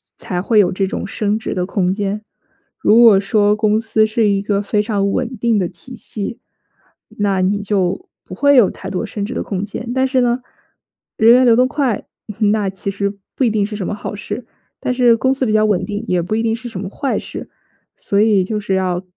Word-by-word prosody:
才 180 -1 -4
会 215 +3 +3
有 185 -3 +4
这 190 +1 -1
种 - - -4
升 210 +1 -1
职 225 - -4
的 180 -1 -1
空 185 -1 0
间。 205 +1 -3 0.6
如 215 - +4
果 225 -5 +7
说 205 +1 +2
公 215 0 +2
司 220 -1 +2
是 215 -1 +1
一 200 -1 +1
个 200 0 0
非 205 +1 0
常 200 -2 0
稳 250 -1 -2
定 230 0 +1
的 180 - 0
体 255 +8 -12
系， 225 -1 -6 0.8
那 200 -2 +1
你 200 +2 +1
就 200 - -1 0.2
不 - - -11
会 285 0 +4
有 235 -7 +6
太 190 - -8
多 190 +3 -3
升 210 -1 -5
职 235 - -5
的 - - -3
空 195 -1 -3
间。 230 +3 -6
但 260 0 +2
是 260 -1 +1
呢， 245 0 +1 0.8
人 225 +2 +6
员 255 +1 +5
流 235 -2 +6
动 250 +2 +4
快， 265 -5 -1 0.3
那 210 -2 +2
其 190 +1 -5
实 200 0 -3 0.2
不 - - 0
一 240 - +4
定 210 -2 +1
是 210 +1 -6
什 190 - -4
么 - - -2
好 205 - -6
事， 210 +3 -6 0.3
但 250 - -1
是 245 -2 +4
公 260 +3 +2
司 270 -1 -1
比 215 - 0
较 215 0 +4
稳 205 -4 +1
定， 205 +1 -4
也 180 -3 +1
不 190 +6 -2
一 225 - 0
定 225 -1 +1
是 240 +1 -8
什 195 - -7
么 190 0 -5
坏 275 +6 -2
事， - - -7 0.5
所 200 - -1
以 210 -3 +4
就 210 +3 -3
是 200 -2 -1
要 185 -1 -1
210 Hz, 245 characters per minute, -18 LUFS, 200-230 Hz, 0.8 s, 果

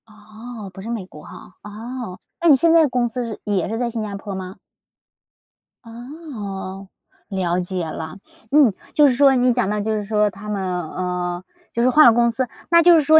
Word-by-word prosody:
哦， 215 0 -10
不 190 - -9
是 220 - -7
美 225 -5 -3
国 150 -4 -14
吼。 - - -11 0.3
哦， 220 -1 -7 0.2
那 340 - +2
你 290 - +9
现 330 +5 +3
在 325 -2 +6
公 250 -2 0
司 245 +2 -3
是 225 -2 -6
也 200 -5 -1
是 225 - -2
在 240 0 -1
新 230 -1 -4
加 210 -2 -4
坡 200 0 -6
吗？ 185 0 -7 1.3
哦， 225 - -8 0.4
了 180 -3 0
解 180 -1 -3
了。 160 +3 -6 0.3
嗯， 280 -7 +5 0.2
就 295 -1 +6
是 265 - +3
说 275 0 +5
你 250 0 +3
讲 240 -5 0
到 210 0 -1
就 220 +2 -1
是 210 - -2
说 210 0 +1
他 205 +1 -11
们 205 -2 -2
嗯， 180 0 -3 0.3
就 235 - 0
是 250 - +4
换 305 +4 +7
了 235 - +8
公 235 0 +3
司， 250 +2 0 0.2
那 335 0 +6
就 350 +1 +8
是 325 - +6
说 315 +2 +6
220 Hz, 220 characters per minute, -21 LUFS, 190-250 Hz, 1.3 s, 你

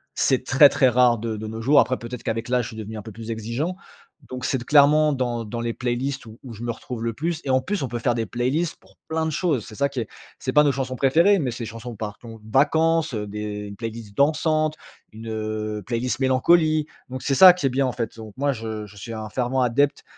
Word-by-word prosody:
C'est 130 -1 +2
très, 140 +2 +7
très 130 -2 +3
rare 120 -1 +4
de 110 0 -3
de 110 - -6
nos 110 +1 -6
jours. 140 +5 +5
Après, 130 - +2
peut-être 115 +2 -8
qu'avec 115 +1 -3
l'âge, 125 -2 +1
je - - -6
suis 110 - -10
devenu 110 0 -6
un 105 - -5
peu 110 - -9
plus 115 +2 -7
exigeant. 115 +11 -3 0.5
Donc, 130 0 -6
c'est 135 - +1
d 120 - -9
clairement 150 +1 +5
dans 120 -3 -2
dans 115 +2 -5
les 115 -1 -2
playlists, 125 +2 -3
où 110 +1 -13
où 125 - -9
je 110 - -11
me 120 - -1
retrouve 115 0 -7
le 115 - -1
plus. 165 +4 -2
Et - - -3
en 130 0 +3
plus, 195 -1 -2
on - - -1
peut 120 0 -4
faire 120 0 +1
des 115 - -1
playlists 135 +8 -1
pour - - -24
plein 160 0 -1
de 160 - -1
choses. 150 - 0
C'est 110 - -11
ça 140 +3 +1
qui 130 -4 -3
est 110 - -5 0.3
c'est - - -2
pas 150 0 +6
nos 145 - +3
chansons 130 -1 -3
préférées, 170 +10 +4
mais 130 -5 -1
c'est 120 0 -6
des - - -5
chansons 115 +1 -8
par 105 -1 -6
ton 115 -2 -11
vacances. 160 +2 +3
Heu 105 -1 -3
des 105 0 -5
playlists 115 -3 -7
dansantes, 155 +1 +2 0.4
une, 115 +1 -9
heu, 110 -1 -3
playlist 120 +4 -2
mélancolie. 155 +4 +3 0.2
Donc, 130 0 -6
c'est 135 - +1
ça 185 +2 +10
qui 175 -6 -4
est - - +1
bien 135 +2 +1
en 125 - -2
fait. 115 -2 -4
Donc 110 -2 -10
moi, 140 +1 +1
je 110 -2 -5
je 100 - -16
suis 115 +3 -7
un 110 -1 -6
fervent 130 +2 -1
adepte 135 +4 +1
125 Hz, 255 wpm, -23 LUFS, 115-140 Hz, 0.5 s, ça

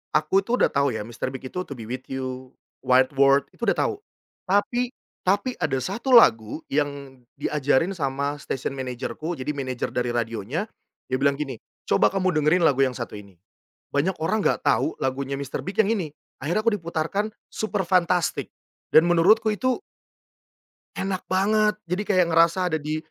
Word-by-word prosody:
aku 155 +6 +3
tuh 230 +5 0
udah - - +3
tahu 140 -3 +1
ya 110 - -3
Mr. 115 +3 -5
Big 130 0 -6
itu 180 - -4
"To 140 - -8
Be 115 - -8
with 125 +4 -6
You," 130 -1 -6 0.2
"White 130 +1 +3
world," 140 0 +5
itu 235 - -5
udah - - +3
tahu. 460 - +1 0.5
Tapi 240 +6 +1 0.3
tapi 205 +7 +2
ada 155 -6 0
1 235 - +1
lagu 115 - +5
yang 140 -2 -2 0.2
diajarin 150 +4 +1
sama 140 -3 -2
stasiun 130 -1 -4
manajerku. 130 +6 -4
Jadi 130 +2 -3
manajer 130 -3 -3
dari 120 -1 -1
radionya 115 - -2 0.5
dia - - +2
bilang 140 0 +3
gini, 135 -5 -5 0.2
"Coba - - +3
kamu 185 -1 0
dengerin 155 +4 +3
lagu 145 -5 +3
yang 130 -2 0
satu - - -6
ini, 100 -3 -15 0.6
banyak 170 +6 +1
orang 195 +7 0
enggak - - 0
tahu 135 +7 +2
lagunya 135 +1 -2
Mr. 140 -1 -4
Big 195 +2 -7
yang 220 -1 +4
ini." 175 -8 -3 0.3
Akhirnya 170 +9 0
aku 230 - +4
diputarkan 175 +3 -2 0.2
"Superfantastic" 185 -4 0 0.4
dan 160 +2 +6
menurutku 185 +6 +4
itu 255 - 0 1.2
Enak 190 -1 -3
banget, 210 +3 +2
jadi 180 +4 -2
kayak 185 -3 +4
ngerasa 170 +2 +3
ada 160 - +1
di 155 +1 -2
155 Hz, 165 wpm, -24 LUFS, 130-190 Hz, 1.2 s, dan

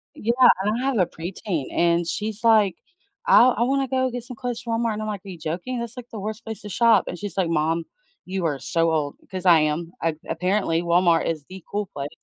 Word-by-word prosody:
Yeah, 230 +3 0 0.3
and 210 +3 0
I - - -2
have 270 -3 +1
a 185 - +4
preteen, 170 -2 -4
and 170 0 +2
she's 215 +4 -4
like, 215 -5 +4 0.5
"I - - +7
I 240 -2 +3
wanna 270 +2 +1
go 260 0 +1
get 245 -1 -5
some 250 +1 -9
clothes 245 -1 -4
from 230 -1 -2
Walmart," 230 -2 0
and 210 - -4
I'm 215 - -4
like, 205 -3 -4
"Are - - -8
you 180 - -8
joking? 175 +11 -4
That's, 235 +1 -6
like, 245 -1 -9
the 220 - -6
worst 215 +2 -5
place 220 -1 -7
to 210 - -8
shop," 230 +4 +4
and - - -5
she's 200 -2 -6
like, 185 -3 +1
"Mom, 165 +1 +1 0.4
you 185 -1 -3
are 145 -4 -1
so 165 +2 +1
old," 150 -3 -1
'cause 185 -1 -6
I 170 -3 +7
am. 155 +2 -1
A 165 -1 0
Apparently, 180 0 0
Walmart 170 -1 +3
is 155 -3 -3
the 190 -1 -10
cool 205 0 -2
place. 140 0 -4
190 Hz, 240 wpm, -23 LUFS, 165-230 Hz, 0.5 s, I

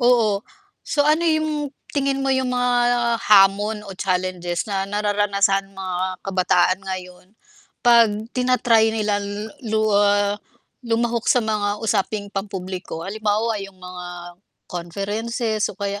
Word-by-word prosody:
Oo. 230 -5 +3 0.4
So 290 - +1
ano 305 +3 +3
'yung, 310 -3 0 0.2
tingin 275 -1 0
mo 270 - +1
'yung 260 -1 0
mga 245 -1 +2
hamon 205 +1 +4
o - - -8
challenges 180 -2 -2
na 195 -1 -1
nararanasan 200 -1 +1
mga 185 -1 -3
kabataan 185 -1 +2
ngayon 180 -1 -7 0.6
'pag 235 -3 +6 0.3
tina-try 240 -3 +3
nila 210 -2 0
l 205 +2 -5 0.2
lu 220 0 +1
ah, 205 0 +3 0.5
lumahok 235 0 0
sa 250 - +5
mga 210 -1 -1
usaping 205 -1 -1
pampubliko, 190 -4 -5
halimbawa 215 +2 0
'yung 195 -1 -9
mga 180 -1 -8 0.6
conferences 210 +5 -2
o - - -11
kaya 200 0 -3
205 Hz, 125 wpm, -22 LUFS, 195-235 Hz, 0.6 s, pag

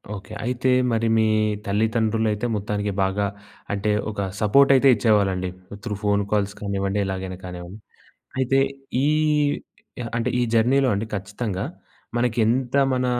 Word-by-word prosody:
Okay. 100 +2 -10
అయితే 125 +1 0 0.2
మరి 115 0 +1
మీ 110 - +4 0.4
తల్లిదండ్రులయితే 110 +1 0
మొత్తానికి 105 0 -2
బాగా 95 +2 0 0.5
అంటే 105 +1 0 0.2
ఒక 100 - -4 0.2
సపోర్ట్ 140 +7 +5
అయితే 135 +1 +5
ఇచ్చేవారండి. 100 -4 +2 0.3
త్రూ 105 -3 -3
ఫోన్ 100 0 +2
కాల్స్ 100 -1 +1
కానివ్వండి. 100 0 -1
ఎలాగైనా 95 -1 -4
కానివ్వండి. 90 +3 -8 0.6
అయితే 135 +1 +3 0.5
ఈ - - +3 1.1
అంటే 115 - 0
ఈ - - +2
జర్నీలో 130 +4 +3
అండి 105 +3 -2
ఖచ్చితంగా. 100 0 -4 0.5
మనకేంత 120 +2 +1 0.2
మన 125 0 0
105 Hz, 125 wpm, -23 LUFS, 100-115 Hz, 1.1 s, సపోర్ట్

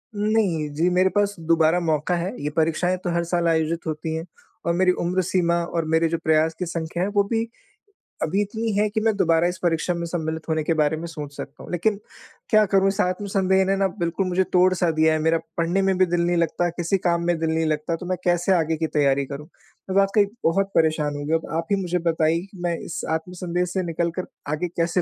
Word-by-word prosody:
नहीं। 205 -7 +1
जी 165 +4 +2
मेरे 185 +1 +3
पास 205 0 +2
दोबारा 165 +1 +3
मौका 160 0 0
है। 175 +3 -2
ये 150 - 0
परीक्षाएँ 165 +3 +1
तो - - -1
हर 170 0 +1
साल 170 0 0
आयोजित 165 0 0
होती 160 +1 -3
हैं। 160 +1 -4 0.4
और 170 - +2
मेरी 185 +1 +4
उम्र 180 +2 +1
सीमा 175 -1 +1 0.2
और 165 -1 0
मेरे 160 +1 +3
जो 165 - 0
प्रयास 160 +1 +3
की 180 - -1
संख्या 170 +1 -3
है, 195 - 0
वो 205 0 +2
भी 225 +2 -1 0.8
अभी 190 +6 +1
इतनी 220 +2 -2
है 210 +1 +2
कि 215 +1 -1
मैं 220 -1 +2
दोबारा 165 -2 +3
इस 180 +1 -3
परीक्षा 170 +1 +1
में 170 0 -3
सम्मिलित 160 -2 -4
होने 160 -1 +1
के 165 - +1
बारे 150 +1 +1
में 165 - -6
सोच 150 -3 -8
सकता 145 - -8
हूँ। - - -10
लेकिन, 200 +4 0 0.5
क्या 215 -2 +5
करूँ 195 0 +5
इस 195 +1 -1
आत्म 185 +2 -1
संदेह 190 0 +3
ने 195 +1 +2
ना 195 0 +2
बिल्कुल 170 +3 -1
मुझे 185 +1 +2
तोड़ 185 0 +5
सा 175 -2 +1
दिया 160 0 +5
है। 155 - 0
मेरा 160 +1 +2 0.2
पढ़ने 170 +3 +1
में 190 -1 +1
भी 185 - +5
दिल 175 0 0
नहीं 175 0 +1
लगता, 170 +1 +1
किसी 175 +3 -1
काम 170 0 +1
में 175 -1 +2
दिल 160 0 0
नहीं 160 0 +1
लगता, 155 +1 -1
तो 170 - -8
मैं 185 - 0
कैसे 175 +1 +2
आगे 160 -1 0
की 160 +1 -1
तैयारी 140 -1 +3
करूँ? 140 +2 -8 0.5
वाक़ई 195 +1 +4 0.2
बहुत 195 +4 +1
परेशान 155 -2 +2
हूँ। 145 0 -5
अब - - -11
आप 165 - -5
ही 200 -1 +2
मुझे 180 -1 -1
बताइए, 160 +1 +1
कि 195 -1 -15
मैं 170 -1 0
इस - - -5
आत्मसंदेह 180 +1 -3
से 190 - +1
निकल 170 0 -1
कर 185 - -4 0.2
आगे 155 +4 -1
कैसे 170 +2 +1
170 Hz, 235 wpm, -23 LUFS, 160-185 Hz, 0.8 s, क्या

